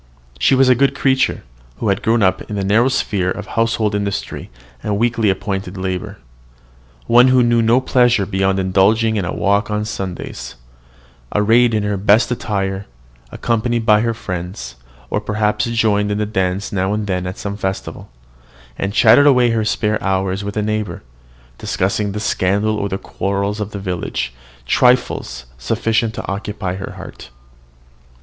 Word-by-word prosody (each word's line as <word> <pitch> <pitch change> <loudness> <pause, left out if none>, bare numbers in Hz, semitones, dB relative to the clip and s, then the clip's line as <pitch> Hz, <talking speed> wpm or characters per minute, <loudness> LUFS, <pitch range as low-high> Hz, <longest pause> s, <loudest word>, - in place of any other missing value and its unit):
She 135 - +4
was 130 0 +4
a 130 - +7
good 135 +3 +2
creature, 135 0 +1 0.3
who 110 - -1
had 100 +3 +1
grown 115 -1 +2
up 95 -1 +2
in 105 - -4
the 100 - -2
narrow 110 +6 +3
sphere 100 -8 0
of - - -4
household 115 -2 0
industry 100 -1 -3 0.3
and 105 -1 -1
weekly 115 -1 +1
appointed 95 -1 -3
labour; 95 -1 -4 0.9
one 120 +2 +6
who 130 -1 +4
knew 120 -1 +3
no 115 +3 +4
pleasure 120 -5 +2
beyond 95 0 0
indulging 100 +4 +2
in 100 -4 -1
a 90 - -3
walk 100 +2 +1
on 105 0 -1
Sundays, 90 - -6 0.8
arrayed 115 +3 +4
in 105 - 0
her 105 -1 -1
best 105 +5 +3
attire, 100 -4 -2 0.4
accompanied 115 0 -1
by 105 -2 +5
her 115 0 -1
friends, 90 0 -6 0.4
or 105 - 0
perhaps 105 0 0
joining 110 -3 +1
in 105 - -1
the 105 - 0
dance 95 -1 -2
now 95 0 0
and 105 0 -2
then 90 -2 -2
at 90 - -6
some 100 0 -4
festival, 95 -2 -5 0.7
and 100 +1 -2
chatting 120 +7 +6
away 125 -4 +5
her 115 -1 +1
spare 105 0 0
hours 95 0 -1
with 100 +1 -5
a 105 - +1
neighbour, 105 -4 -3 0.6
discussing 100 +2 -1
the 105 - -3
scandal 100 +1 0
or 100 -1 -2
the 95 - -2
quarrels 100 +2 -3
of 105 -1 -3
the 105 - -7
village, 90 -10 -3 0.3
trifles 95 - +1
sufficient 115 - 0
to - - -6
occupy 100 -1 -4
her 95 - -6
heart. - - -11
105 Hz, 165 wpm, -18 LUFS, 95-115 Hz, 0.9 s, a